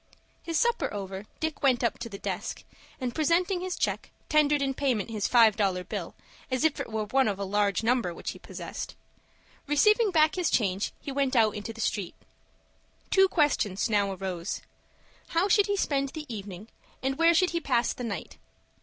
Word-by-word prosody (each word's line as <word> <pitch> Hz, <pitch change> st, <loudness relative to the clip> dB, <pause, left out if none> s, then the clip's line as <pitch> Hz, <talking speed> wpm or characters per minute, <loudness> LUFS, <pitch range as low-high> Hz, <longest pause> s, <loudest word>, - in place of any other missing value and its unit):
His 330 Hz, -1 st, -2 dB
supper 475 Hz, -1 st, +1 dB
over, 195 Hz, 0 st, -6 dB
Dick 315 Hz, -1 st, -3 dB
went 255 Hz, -3 st, +3 dB
up 235 Hz, -, 0 dB
to 235 Hz, -, -5 dB
the 200 Hz, -, -7 dB
desk, -, -, -4 dB, 0.4 s
and, 250 Hz, -3 st, -3 dB
presenting 350 Hz, +5 st, +1 dB
his 370 Hz, -1 st, -3 dB
check, -, -, -2 dB, 0.2 s
tendered 295 Hz, -1 st, +4 dB
in 275 Hz, -1 st, 0 dB
payment 250 Hz, -6 st, -1 dB
his 215 Hz, -3 st, -1 dB
five 230 Hz, -4 st, +6 dB
dollar 190 Hz, -4 st, 0 dB
bill, 180 Hz, -, -5 dB, 0.3 s
as 255 Hz, +1 st, 0 dB
if 315 Hz, -2 st, +2 dB
it -, -, -5 dB
were 220 Hz, -1 st, -1 dB
one 265 Hz, +4 st, +2 dB
of 200 Hz, -2 st, -1 dB
a 200 Hz, -, -3 dB
large 205 Hz, +1 st, +1 dB
number 235 Hz, -5 st, +2 dB
which 170 Hz, -, -5 dB
he -, -, -11 dB
possessed. -, -, -7 dB, 0.7 s
Receiving 425 Hz, -, +4 dB
back 315 Hz, -4 st, +4 dB
his 360 Hz, -4 st, 0 dB
change 195 Hz, -3 st, +1 dB
he 280 Hz, -, -6 dB
went 275 Hz, -1 st, 0 dB
out 220 Hz, -3 st, +4 dB
into 210 Hz, +2 st, -5 dB
the 225 Hz, -, -12 dB
street. 200 Hz, -4 st, -2 dB, 1.0 s
Two 385 Hz, 0 st, +6 dB
questions 245 Hz, -, +1 dB
now 200 Hz, -1 st, +2 dB
arose: 185 Hz, -1 st, -4 dB, 0.7 s
How 335 Hz, +4 st, +1 dB
should 410 Hz, +1 st, +4 dB
he 405 Hz, 0 st, 0 dB
spend 275 Hz, -6 st, 0 dB
the 310 Hz, +2 st, -7 dB
evening, 205 Hz, -2 st, -7 dB, 0.3 s
and 270 Hz, +2 st, -1 dB
where 335 Hz, 0 st, +5 dB
should 365 Hz, +2 st, +3 dB
he 335 Hz, 0 st, -1 dB
pass 245 Hz, -5 st, +1 dB
the 250 Hz, -, -7 dB
night? 200 Hz, -8 st, -5 dB
250 Hz, 190 wpm, -28 LUFS, 205-315 Hz, 1.0 s, five